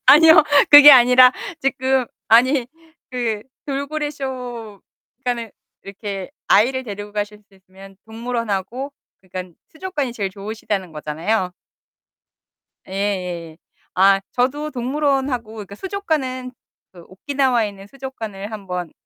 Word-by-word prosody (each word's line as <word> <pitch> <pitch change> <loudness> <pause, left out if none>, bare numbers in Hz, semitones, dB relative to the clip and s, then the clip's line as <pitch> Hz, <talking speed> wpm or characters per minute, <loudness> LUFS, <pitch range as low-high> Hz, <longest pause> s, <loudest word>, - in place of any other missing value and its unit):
아니요. 320 +1 +8 0.3
그게 290 0 +11
아니라 250 -1 +7 0.3
지금 265 -1 0 0.2
아니 250 +3 +4 0.4
그 230 -4 -2 0.2
돌고래 290 +2 -3
쇼. 245 -7 -7 0.4
그러니까는 245 -3 -3 0.3
이렇게 195 -1 -7 0.2
아이를 260 +6 +3
데리고 205 -2 -7
가실 210 0 -4
수 195 - -25
있으면 190 +1 -16
동물원하고 230 +2 -4 0.3
그러니깐 185 -2 -8 0.2
수족관이 315 -7 -4
제일 200 -5 -3
좋으시다는 200 -2 -5
거잖아요? 170 +6 -2 1.4
예예예. 180 -5 -3 0.4
아, 195 +1 +5
저도 285 +5 -1
동물원하고 265 -3 -1
그러니까 200 -2 -9
수족관은 270 - -3 0.4
그 175 -2 -14
오키나와에 250 +2 0
있는 195 -1 -12
수족관을 220 -5 -8
한번 180 -5 -6
230 Hz, 295 characters per minute, -20 LUFS, 195-265 Hz, 1.4 s, 그게